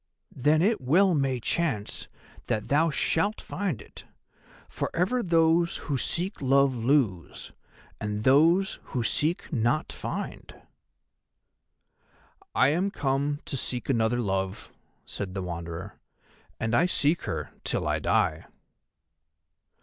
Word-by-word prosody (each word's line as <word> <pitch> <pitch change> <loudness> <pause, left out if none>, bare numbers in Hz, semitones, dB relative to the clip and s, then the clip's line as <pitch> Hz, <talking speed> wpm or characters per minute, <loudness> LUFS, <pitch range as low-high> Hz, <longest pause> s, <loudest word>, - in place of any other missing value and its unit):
"Then 150 +5 +3
it 215 -2 +2
well 175 +9 +4
may 135 -4 +1
chance 120 -5 -1 0.4
that 105 -1 -2
thou 155 +4 +3
shalt 165 +7 0
find 180 - -3
it, - - -13 0.6
for - - -3
ever 195 +9 +1
those 170 -2 +3
who 145 - -3
seek 175 - -2
love 135 0 +3
lose, 115 - 0 0.5
and 105 0 -3
those 165 - +4
who 125 - -2
seek 155 - -1
not 120 +4 +1
find." - - -6 2.0
"I 130 - +5
am 175 +7 +1
come 145 -4 -1
to - - -4
seek 125 -1 -3
another 120 -1 +2
love," 95 -2 -2 0.3
said 95 -2 -6
the 95 - -2
Wanderer, 85 -2 -6 0.6
"and 115 0 -1
I 175 +9 +4
seek 160 -1 +1
her - - -4
till - - -1
I - - +1
die." - - +1
140 Hz, 120 wpm, -27 LUFS, 115-170 Hz, 2.0 s, I